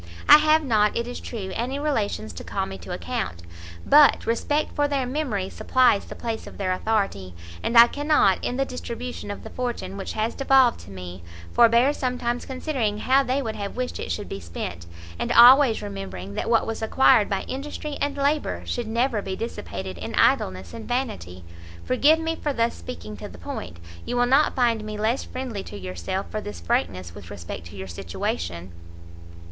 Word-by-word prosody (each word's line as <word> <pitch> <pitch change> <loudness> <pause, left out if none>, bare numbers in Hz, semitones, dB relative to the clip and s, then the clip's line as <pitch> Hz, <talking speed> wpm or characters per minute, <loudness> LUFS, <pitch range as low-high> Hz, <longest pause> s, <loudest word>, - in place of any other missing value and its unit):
I 295 - +10
have 310 +1 +4
not, 215 -6 +2
it 235 - -1
is 245 - -6
true, 200 -6 -6
any 255 +4 -2
Relations 225 -7 -2
to - - -8
call 195 -1 -2
me 195 0 -8
to - - -9
account, 180 - -4 0.4
but 295 -1 +6
respect 290 +6 0
for 290 0 +2
their 275 -3 -1
memory 250 -8 -2
supplies 250 -1 +2
the - - -9
place 230 -2 -4
of - - -11
their 190 -2 -1
authority, 185 - -1 0.3
and 235 - +1
I 235 - +11
cannot, 290 -7 +2
in 245 - -2
the 270 - +1
distribution 245 -3 -6
of 205 - -6
the - - -9
fortune 235 -6 -4
which 195 - -5
has 220 +1 -1
devolved 270 -3 +4
to - - -13
me, 90 -1 -8 0.3
forbear 235 +4 +5
sometimes 245 -3 -2
considering 255 -6 -2
how 260 +5 +3
they 270 +1 -1
would 220 -2 -4
have 200 -1 -5
wished 250 0 -3
it - - -4
should 205 - -3
be 95 - -6
spent, 85 0 -6 0.3
and - - -1
always 250 0 +7
remembering 95 -1 -6
that - - -3
what 230 -1 +3
was 225 0 -4
acquired 225 0 +4
by 195 - -1
industry 290 +2 -5
and 285 0 -1
labour, 285 +2 0
should 240 -2 -3
never 230 0 0
be 190 - -4
dissipated 95 - -6
in - - -5
idleness 95 -2 +2
and - - -8
vanity. 95 - -3 0.4
Forgive 285 +5 +4
me 325 0 -2
for 295 -2 -2
thus 230 -2 +1
speaking 85 +5 -8
to - - -8
the 90 - -12
point; 85 0 -7 0.3
you - - -4
will 245 - +4
not 270 +5 +3
find 235 -4 +2
me 215 0 -5
less 220 +5 0
friendly 255 -6 -5
to 105 - -9
yourself, 90 - -4
for 215 - -3
this 205 0 -7
frankness 90 - -1
with 95 -3 -11
respect 85 -3 -7
to 85 - -12
your 95 0 -7
situation." 85 0 -4
225 Hz, 190 wpm, -24 LUFS, -, 0.4 s, I